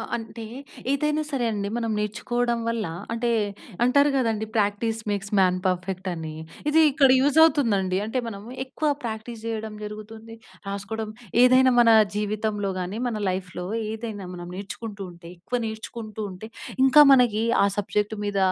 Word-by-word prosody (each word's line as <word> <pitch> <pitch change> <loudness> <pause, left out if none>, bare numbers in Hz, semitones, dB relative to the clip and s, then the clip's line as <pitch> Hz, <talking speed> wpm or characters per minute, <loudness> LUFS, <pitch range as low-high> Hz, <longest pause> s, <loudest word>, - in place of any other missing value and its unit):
ఆహ్, 225 - -6
అంటే 225 0 -8 0.5
ఏదైనా 300 +2 +1
సరే 270 -4 -1
అండి, 200 -1 -2
మనం 230 -1 -1
నేర్చుకోవడం 235 +3 -1
వల్ల 230 -2 -1 0.3
అంటే 235 +1 0 0.5
అంటారు 280 +4 +4
గదండీ 225 -4 0
'ప్రాక్టీస్ 215 +2 0
మేక్స్ 200 0 -3
మాన్ 185 -1 +4
పర్ఫెక్ట్' 185 +1 -2
అని. 160 -2 -6 0.3
ఇది 310 +2 +5
ఇక్కడ 275 0 +4
యూజ్ 285 +3 +3
అవుతుందండి. 210 - +3
అంటే 225 +4 -2
మనము, 205 0 -8 0.2
ఎక్కువ 295 +3 -1
ప్రాక్టీస్ 225 0 -5
జేయడం 220 -1 -4
జరుగుతుంది, 220 +2 -9 0.3
రాసుకోవడం, 200 +2 -4 0.3
ఏదైనా 255 +1 +6
మన 235 - +5 0.3
జీవితంలో 210 -1 -1
గాని, 185 +4 -4
మన 230 - -3
లైఫ్‌లో 180 -1 -4 0.2
ఏదైనా 220 -3 -5
మనం 175 -1 -7
నేర్చుకుంటూ 205 +1 -7
ఉంటే, 170 0 -13
ఎక్కువ 245 +8 -2
నేర్చుకుంటూ 220 0 -7
ఉంటే 185 +3 -9 0.4
ఇంకా 265 +3 +7
మనకి 240 -5 +4 0.2
ఆ - - +5
సబ్జెక్ట్ 210 +1 0
మీద 200 -1 -1
220 Hz, 145 wpm, -25 LUFS, 200-240 Hz, 0.5 s, ఇంకా